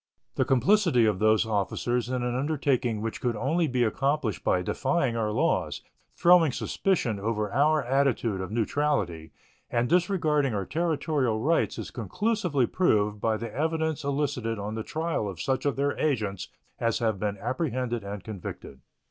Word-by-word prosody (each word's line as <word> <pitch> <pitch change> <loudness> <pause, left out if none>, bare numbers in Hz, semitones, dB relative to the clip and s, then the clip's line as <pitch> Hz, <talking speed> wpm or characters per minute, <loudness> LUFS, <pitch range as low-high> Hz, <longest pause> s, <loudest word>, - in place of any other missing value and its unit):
The - - +1
complicity 135 - +3
of 105 -4 +1
those 110 +1 +4
officers 115 +3 -1
in 125 -1 -1
an 120 0 -1
undertaking 130 -5 0
which 115 0 -4
could 120 -2 0
only 160 +8 +1
be 125 -2 +1
accomplished 135 0 0
by 90 - +2
defying 135 - 0
our 110 -2 0
laws, - - 0 0.3
throwing 170 -4 +5
suspicion 125 - -1
over 105 0 -2
our 150 +3 +3
attitude 125 -6 +1
of 95 - -5
neutrality, 105 - -1 0.4
and 120 +1 +1
disregarding 155 - +2
our 100 -2 -2
territorial 145 - 0
rights 155 +8 +1
is - - -6
conclusively 150 - 0
proved 105 - +1
by 110 -1 +1
the 115 -1 -6
evidence 160 0 -1
elicited 140 -5 -1
on 105 +1 -4
the 110 - -3
trial 160 -6 -2
of 90 -4 -8
such 130 +5 0
of 140 - 0
their 140 +1 0
agents 105 -10 -1 0.3
as 115 -1 +1
have 110 -4 0
been 100 0 -2
apprehended 125 - -2
and 100 -1 -6
convicted. 95 -9 -8
125 Hz, 155 wpm, -27 LUFS, 110-150 Hz, 0.4 s, throwing